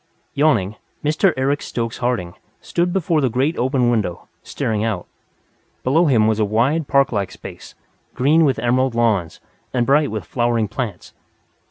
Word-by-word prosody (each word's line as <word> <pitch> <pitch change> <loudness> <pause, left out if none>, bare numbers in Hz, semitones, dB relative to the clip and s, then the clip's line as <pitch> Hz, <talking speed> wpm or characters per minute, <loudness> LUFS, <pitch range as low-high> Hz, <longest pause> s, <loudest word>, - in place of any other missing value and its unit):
Yawning, 115 -9 +2 0.3
Mr. 155 +6 +3
Eric 140 +2 0
Stokes 115 -1 -4
Harding 120 -9 -1 0.3
stood 175 +1 -1
before 170 -4 +1
the 130 - +2
great 135 +8 0
open 125 -1 +2
window, 105 -7 -2
staring 110 -1 -2
out. 110 -6 -2 0.8
Below 160 +7 +3
him 115 -6 +4
was 110 0 +1
a - - +3
wide, 125 +9 +1
park 140 -1 +3
like 100 -4 -2
space, - - -11 0.4
green 150 +6 +4
with 140 -4 +2
emerald 125 +1 +1
lawns, 110 -8 +1 0.4
and 120 -1 +2
bright 145 +2 +3
with - - -5
flowering 120 -3 0
plants. 105 -6 -5
125 Hz, 155 wpm, -20 LUFS, 110-145 Hz, 0.8 s, him